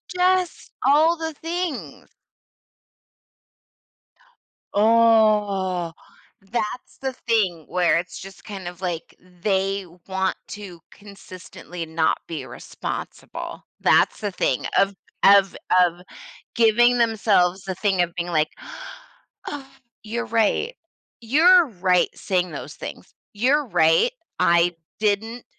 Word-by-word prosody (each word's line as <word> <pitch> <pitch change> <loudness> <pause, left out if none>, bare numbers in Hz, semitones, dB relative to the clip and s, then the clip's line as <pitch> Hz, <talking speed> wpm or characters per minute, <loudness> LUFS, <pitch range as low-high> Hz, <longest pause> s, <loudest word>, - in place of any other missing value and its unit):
Just 365 0 +1
all 315 +4 +4
the 320 -1 -4
things. 335 -1 -5 2.6
Oh, 210 -5 +3 0.6
that's 235 0 -4
the 265 -1 -3
thing 190 -9 +1
where 175 -3 +2
it's 170 0 -5
just 195 0 -12
kind 195 -4 -7
of, 175 +1 -9
like, 175 -3 -4 0.3
they 195 0 0 0.2
want 190 0 -1
to 195 -5 -9
consistently 185 -3 -10
not 160 0 +1
be 155 -6 -5
responsible. - - -7 0.2
That's - - +3
the 205 -2 -2
thing 130 -7 -1
of 195 0 +3 0.3
of 195 -1 +6 0.3
of 175 -1 +1 0.6
giving 235 +2 +4
themselves 205 -5 +2
the 190 -1 -4
thing 190 -1 +1
of 175 -1 -1
being 175 0 -3
like, 155 -2 +2 1.0
"Oh, 280 -2 -7 0.4
you're 235 +2 -3
right. 230 - +1 0.5
You're 330 +9 +6
right 180 -5 +2
saying 180 -2 -1
those - - -8
things. - - -9 0.2
You're 265 +8 +2
right, 170 - +3 0.3
I 170 0 +3 0.2
didn't 220 +3 -1
200 Hz, 110 wpm, -23 LUFS, 180-235 Hz, 2.6 s, of